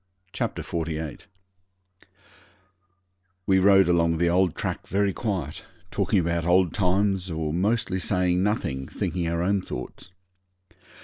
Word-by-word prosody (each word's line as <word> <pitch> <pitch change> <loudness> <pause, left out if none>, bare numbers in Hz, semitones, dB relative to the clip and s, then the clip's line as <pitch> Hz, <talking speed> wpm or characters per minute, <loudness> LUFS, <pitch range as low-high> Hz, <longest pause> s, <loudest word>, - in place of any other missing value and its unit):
Chapter - - -3
48 80 -1 -4 2.2
We 95 -1 +4
rode 95 0 +6
along 85 -1 +2
the 85 +1 +2
old 90 -1 +2
track - - -4
very 100 0 +1
quiet, 90 - -3 0.3
talking 100 +1 +1
about 85 -1 0
old 90 +1 +3
times 95 -1 +1
or 80 -2 -2
mostly 95 +1 0
saying 90 -1 +1
nothing, 70 -10 -1
thinking 90 -2 -3
our 85 +1 -1
own 100 +1 +1
thoughts. 90 - -8
90 Hz, 120 wpm, -25 LUFS, 85-95 Hz, 2.2 s, rode